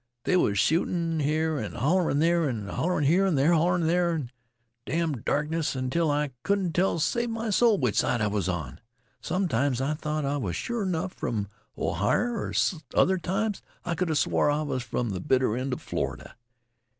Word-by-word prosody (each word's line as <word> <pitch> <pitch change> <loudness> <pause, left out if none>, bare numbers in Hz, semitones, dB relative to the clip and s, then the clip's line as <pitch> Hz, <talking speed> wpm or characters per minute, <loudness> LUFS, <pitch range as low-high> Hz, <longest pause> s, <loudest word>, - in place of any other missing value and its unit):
There 185 - +3
was 100 -10 +1
shootin' 165 - +1
here 155 +1 0
an' 105 - -5
shootin' 160 0 +1
there, 165 0 +2
an' 110 -5 -4
hollerin' 170 - 0
here 180 +7 +4
an' 170 -6 +1
hollerin' 170 +2 +3
there, 170 +1 +2
in 140 -7 -4
th' - - -30 0.6
damn' 160 -7 -1
darkness, 150 +3 -1
until 130 +6 0
I 145 -1 0
couldn't 195 -4 0
tell 185 +4 +2
t' 165 - -2
save 235 +5 0
m' 225 -1 -2
soul 225 +1 +4
which 125 -6 0
side 120 - +1
I 105 - +1
was 100 -3 -1
on. 80 -4 -4 0.4
Sometimes 140 - 0
I 135 +3 0
thought 150 -1 -3
I 140 +1 0
was 95 - -3
sure 235 -4 -2
'nough 180 +1 -2
from 105 -4 -3 0.3
Ohier, 210 - 0
an' 170 -5 0 0.2
other 190 0 +4
times 200 +4 -1 0.2
I 175 - -1
could 180 +1 -1
'a 160 - 0
swore 145 - +2
I 150 +1 +1
was 130 -4 -2
from 120 -2 -2
th' 90 -1 -6
bitter 130 -4 +2
end 130 +2 -2
of 125 - -4
Florida. - - -4
155 Hz, 190 wpm, -27 LUFS, 130-180 Hz, 0.6 s, here